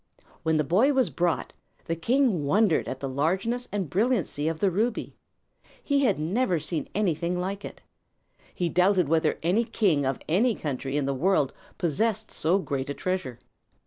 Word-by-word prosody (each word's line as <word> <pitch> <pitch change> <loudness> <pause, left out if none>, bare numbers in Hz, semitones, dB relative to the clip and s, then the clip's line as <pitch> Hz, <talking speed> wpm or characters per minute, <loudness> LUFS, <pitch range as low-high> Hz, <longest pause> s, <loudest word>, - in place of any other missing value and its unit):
When 160 -1 +1
the 155 - +2
boy 215 - +3
was 260 -3 +2
brought, 175 -2 -1 0.3
the 165 - -1
king 225 - +1
wondered 195 +4 +2
at 130 - -5
the 140 - -2
largeness 190 - -1
and 200 -4 -2
brilliancy 185 - 0
of 160 0 -2
the 195 -2 +2
ruby. 220 +6 -1 0.7
He 280 -1 +2
had 210 -6 +2
never 180 +4 0
seen 155 -1 -4
anything 180 -3 0
like 195 +2 -3
it. - - -9 0.7
He 175 - -1
doubted 180 0 +3
whether 160 +1 +2
any 185 +8 +2
king 170 - +1
of 135 - -1
any 215 +8 +2
country 140 -1 -3
in 145 - 0
the 140 - 0
world 140 -1 +1 0.2
possessed 215 +6 -1
so 170 +5 +1
great 140 -8 -3
a 145 - -3
treasure. 185 -10 -3
180 Hz, 170 wpm, -26 LUFS, 155-210 Hz, 0.7 s, boy